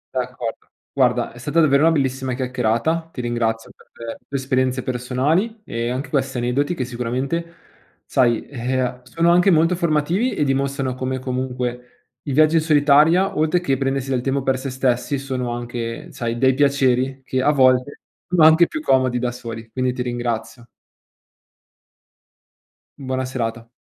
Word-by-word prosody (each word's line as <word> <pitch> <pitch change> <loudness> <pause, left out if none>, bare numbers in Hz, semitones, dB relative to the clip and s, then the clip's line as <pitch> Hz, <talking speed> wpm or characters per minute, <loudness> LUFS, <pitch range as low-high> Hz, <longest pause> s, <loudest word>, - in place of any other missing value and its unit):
D'accordo. 125 -2 -4 0.3
Guarda - - +1
è 120 - -13
stata 145 +7 0
davvero 140 -3 +4
una 165 +1 +5
bellissima 130 -4 -1
chiacchierata, 130 +6 -1
ti - - -9
ringrazio 115 -2 -2
per 115 -1 -10
le 140 - -3
esperienze 130 -1 0
personali 140 - -1
e 115 +1 -3
anche 130 +3 -3
questi 135 -2 -1
aneddoti 130 +7 0
che 130 - -2
sicuramente, 130 +8 -3 0.5
sai, 120 -3 +1
e 130 -1 -2
uhm, 125 0 -4
sono 165 +7 +1
anche 180 +3 +4
molto 165 0 +4
formativi 170 - 0
e - - +1
dimostrano 135 -1 -1
come 130 +1 -3
comunque 125 -1 -4 0.4
i 145 - -3
viaggi 155 +3 +4
in - - +3
solitaria, 155 +5 +4
oltre 155 +3 +2
che 175 - -9
per 135 - +1
prendersi 135 0 -1
del 130 -2 0
tempo 135 +1 -1
per 130 -1 0
sè 135 - -4
stessi, 130 +1 0
sono 130 -2 -3
anche, 120 -1 -5
sai, 115 -1 -3
dei 130 +2 +3
piaceri 135 -1 +1
che 130 0 -1
a 140 - +3
volte 130 -1 +2 0.3
sono 175 -3 +3
anche 160 +2 +7
più 315 - -5
comodi 130 - +2
da 125 0 -1
soli. 115 -2 -8
Quindi 130 +1 -1
ti 125 -1 -3
ringrazio. 120 -1 -4 2.3
Buona 130 -1 -3
serata. 115 -3 -4
130 Hz, 160 wpm, -21 LUFS, 125-145 Hz, 2.3 s, anche